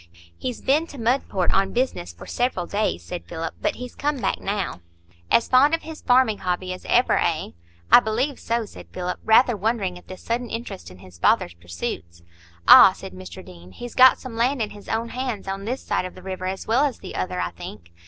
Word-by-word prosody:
"He's 250 - -5
been 300 +5 +2
to 285 - -11
Mudport 230 -6 0
on 195 0 +2
business 240 - -1
for 85 - -13
several 245 -7 -1
days," 200 - -1
said 85 - -6
Philip; 160 - -5
"but 310 - 0
he's 250 0 -8
come 295 0 -1
back - - -1
now." 200 - -3 0.5
"As 235 - +3
fond 280 +5 +5
of 330 - -8
his 320 0 -9
farming 245 -4 +3
hobby 185 0 -2
as 185 - -10
ever, - - +4
eh?" - - 0 0.4
"I - - +10
believe 245 +5 -1
so," 230 0 -1
said - - -12
Philip, 180 0 -4
rather 230 +2 +5
wondering 200 -3 -1
at - - -23
this 185 - -10
sudden 235 +1 -2
interest 95 - -6
in 90 - -14
his 90 -2 -15
father's 85 - +2
pursuits. 85 0 -7 0.4
"Ah!" - - +10
said - - -10
Mr 90 -2 -10
Deane, 90 +1 -14
"he's 245 0 -8
got 260 0 +7
some 255 -3 -8
land 250 +4 +1
in 215 -2 -2
his 205 -1 -12
own 230 +1 -1
hands 250 -6 -4
on 195 +1 -4
this 255 +4 -3
side 185 0 -2
the 185 - -13
river 185 -1 -4
as 190 +1 -4
well 235 +6 +3
as 280 -5 0
the - - -9
other, 90 0 -3
I 85 -1 -2
think?" 85 0 -10
210 Hz, 210 wpm, -23 LUFS, 175-250 Hz, 0.5 s, I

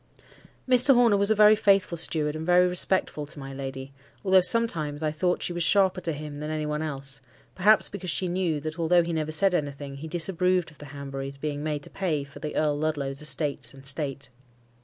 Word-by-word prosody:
Mr. 255 +1 +5
Horner 240 -4 +4
was 200 +1 +2
a 220 - +3
very 210 0 +6
faithful 200 -4 +2
steward, 155 -2 +1
and 155 - -5
very 180 +1 +4
respectful 180 -4 0
to 150 - -11
my 135 -1 -8
lady; 135 0 -7 0.3
although 190 -1 +5
sometimes, 165 -8 +1
I 155 - 0
thought 180 +3 -1
she 175 - -3
was 175 - -4
sharper 190 0 +2
to 170 - -2
him 150 -1 -7
than 150 +1 -5
to 155 - -3
any 155 -1 -3
one 150 0 -3
else; 135 -3 -3 0.3
perhaps 210 +3 +4
because 190 -3 -7
she 185 +3 0
knew 175 -3 -1
that, 155 +3 -6
although 170 +1 +3
he 170 0 -4
never 155 -1 -2
said 190 +4 +3
anything, 145 -3 -4
he 155 +3 -8
disapproved 180 +1 0
of 150 - -22
the 145 - -10
Hanburys 140 -1 -7
being 145 0 -4
made 150 -1 -3
to - - -10
pay 165 -7 -2
for 140 +1 -13
the 150 - -6
Earl 150 -1 0
Ludlow's 145 -3 -2
estates 145 -1 -1
and 135 0 -15
state. 140 0 -3
155 Hz, 215 wpm, -26 LUFS, 145-180 Hz, 0.3 s, very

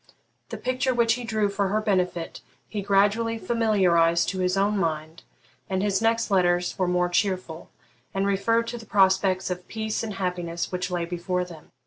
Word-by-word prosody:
The - - -5
picture 255 0 -1
which 230 -1 +3
he 245 +1 -4
drew 215 -2 0
for 200 0 -1
her 210 +3 +1
benefit 180 -5 -1 0.3
he 210 - -4
gradually 205 +4 +2
familiarised 185 -8 +2
to 190 - -4
his 185 +1 +1
own 200 +2 +2
mind, 160 -3 -2 0.5
and 190 0 0
his 205 0 +1
next 225 -1 +1
letters 180 -2 +2
were 185 - +2
more 180 0 +2
cheerful, 180 -3 -2 0.4
and 195 0 -1
referred 230 +4 +1
to 240 - -5
the 225 - -13
prospects 190 -1 +2
of 180 0 -5
peace 220 -1 -3
and 215 -3 -5
happiness 175 -3 -3
which 180 0 -2
lay 175 -2 -1
before 180 +1 -2
them. 165 -4 -13
190 Hz, 175 wpm, -25 LUFS, 180-215 Hz, 0.5 s, which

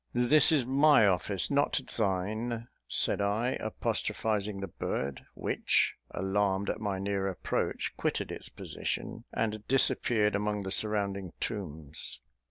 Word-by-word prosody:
"This 125 +7 +5
is 145 -6 +4
my 140 -2 +5
office, 95 - +1
not 140 0 +2 0.2
thine," 110 +4 -1 0.2
said - - +2
I, 110 +5 +1
apostrophising 105 -2 -1
the 95 - -4
bird, 70 -5 -4
which, - - +1 0.2
alarmed 95 +1 0
at 110 - -6
my 100 -3 -1
near 100 0 -1
approach, 95 - -2
quitted - - -1
its - - -5
position, - - -4
and 110 -1 -2
disappeared 115 -5 +3
among 105 0 -1
the 95 - -4
surrounding 100 -3 0
tombs. 80 -8 -4
105 Hz, 125 wpm, -30 LUFS, 95-115 Hz, 0.2 s, This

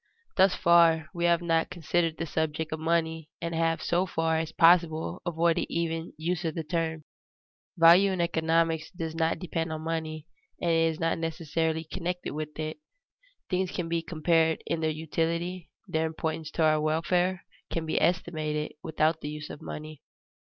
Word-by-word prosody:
_ - - -52
Thus 190 0 +5
far 165 -2 +4
we 170 -1 -1
have 170 0 +3
not 165 -1 +1
considered 170 -1 0
the 165 - -2
subject 160 0 -2
of 155 - -3
money 160 -1 0
and 170 0 -3
have 165 0 0
so 180 +2 +1
far 160 -1 0
as 160 0 -3
possible 165 -1 +3
avoided 170 0 +1
even 165 0 -2
the 155 - -12
use 175 +1 -1
of 160 -2 -2
the 165 - -2
term. 160 -1 -2 0.7
Value 170 +4 +7
in 185 - -2
economics 165 -1 +1
does 165 -3 -5
not 165 0 +1
depend 165 -2 -3
on 155 0 -4
money, 160 -1 -3 0.3
and 170 - +1
is 165 -1 +2
not 165 0 0
necessarily 160 0 -1
connected 180 +2 -4
with 150 0 -5
it. 155 - -4 0.7
Things 185 -1 0
can 175 -2 -3
be 165 0 0
compared 160 0 +1
in 165 - -1
their 160 - +1
utility, 165 +3 -2 0.2
their 160 0 0
importance 160 -1 -3
to 165 - +1
our 155 -1 +4
welfare 175 +4 +1 0.2
can 165 -1 -2
be 160 - 0
estimated, 155 -3 0
without 160 +1 0
the 150 - -4
use 150 0 -7
of - - -9
money. 155 -1 -8
165 Hz, 170 wpm, -28 LUFS, 160-170 Hz, 0.7 s, Value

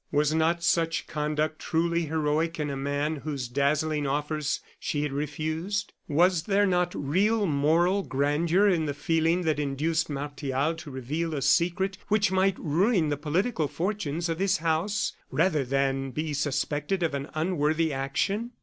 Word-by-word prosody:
Was 150 +1 +2
not 165 +2 +1
such 165 -1 +1
conduct 150 0 -2
truly 170 0 0
heroic 160 +2 0
in 150 -1 -1
a - - -3
man 145 +3 -1
whose 140 -4 -4
dazzling 145 +3 0
offers 150 +1 -1 0.2
she 145 -1 -2
had 150 - -2
refused? 155 +8 -3
Was 170 +3 +3
there 205 -1 +3
not 180 -2 +1
real 200 +10 +1
moral 165 +5 +2
grandeur 160 +6 +2
in 170 -5 +2
the 145 - -2
feeling 165 +4 +1
that 155 -3 0
induced 155 +3 0
Martial 145 +1 -2
to 160 -2 -9
reveal 150 +5 -3
a 140 - -2
secret 190 +3 +2
which 210 -2 +2
might 190 0 +2
ruin 175 +2 +2
the 145 - +1
political 160 - 0
fortunes 170 +1 -2
of 165 0 -2
his 195 0 +2
house, 165 +6 0 0.2
rather 160 -3 +2
than 135 +1 0
be 150 +4 -3
suspected 145 +5 -1
of 160 - 0
an 140 +1 -4
unworthy 160 -1 +1
action? 195 - -1
155 Hz, 155 wpm, -27 LUFS, 145-175 Hz, 0.2 s, Was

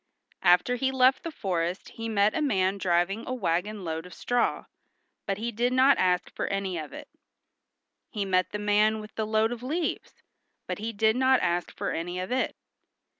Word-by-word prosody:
After 180 +7 +4
he 265 +1 +1
left 260 0 +4
the 335 - -5
forest 180 - -2
he 225 0 -6
met 210 -1 +3
a 315 - 0
man 195 -8 +1
driving 180 +4 +1
a 255 - -2
wagon 200 -1 -1
load 160 +1 -4
of 180 - -12
straw, 245 -1 0 0.6
but 195 -1 -1
he 230 +3 -3
did 240 +3 0
not 260 +2 +5
ask 180 -1 +1
for - - -2
any 195 -2 -2
of 155 - -7
it. - - -9 1.0
He 210 -5 -3
met 185 -1 +1
the 210 - -3
man 210 +1 +2
with 215 0 -10
the 220 -1 -2
load 220 +1 +2
of 240 -1 -5
leaves, 310 +6 -3 0.4
but - - -4
he 225 +2 -3
did 220 +1 +2
not 260 0 +4
ask 175 0 0
for - - -2
any 175 +2 -3
of 185 +5 -5
it. 260 +1 0
210 Hz, 190 wpm, -27 LUFS, 185-245 Hz, 1.0 s, not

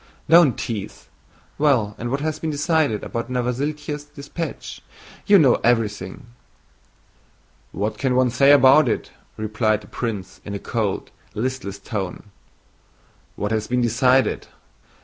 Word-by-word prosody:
"Don't 165 -5 +6
tease! 110 -4 -6 0.5
Well, 130 -9 +2
and 120 - -3
what 135 +3 -2
has 155 0 -2
been 160 - -3
decided 150 -5 0
about 115 +1 -4
Novosíltsev's 145 +4 -3
dispatch? 150 +3 -7 0.5
You 205 -1 +7
know 140 -8 +4
everything." 105 -5 0 1.5
"What 105 +1 -3
can 130 -2 +1
one 130 -1 +3
say 140 +3 +5
about 140 0 +6
it?" - - -2 0.3
replied 110 0 0
the - - -15
prince 105 -6 -5
in 100 - -6
a - - -1
cold, 105 -1 -3 0.2
listless 115 -4 -3
tone. 100 -1 -6 1.0
"What 105 +1 -3
has 110 -1 -1
been 125 0 0
decided? 125 +3 +2
125 Hz, 130 wpm, -22 LUFS, 110-145 Hz, 1.5 s, You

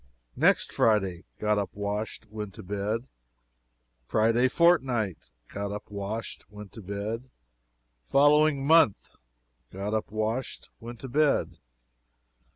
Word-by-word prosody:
"Next - - +3
Friday 95 -5 +1
Got 105 -1 +1
up, 100 - -2
washed, 105 +2 -4
went 105 -3 -6
to - - -10
bed. 105 +5 -3 1.0
"Friday 115 +3 +3
fortnight 130 - +2 0.2
Got 100 0 -3
up, 105 0 -7
washed, 105 +2 -5
went 105 -1 -11
to 110 - -10
bed. 105 +6 -5 0.8
"Following 145 - +4
month 160 -9 +4 0.6
Got 100 +3 -4
up, 110 - -1
washed, 110 +4 -3
went 120 0 -9
to 135 - -6
bed." 145 +3 +1
110 Hz, 115 wpm, -27 LUFS, 100-130 Hz, 1.0 s, Following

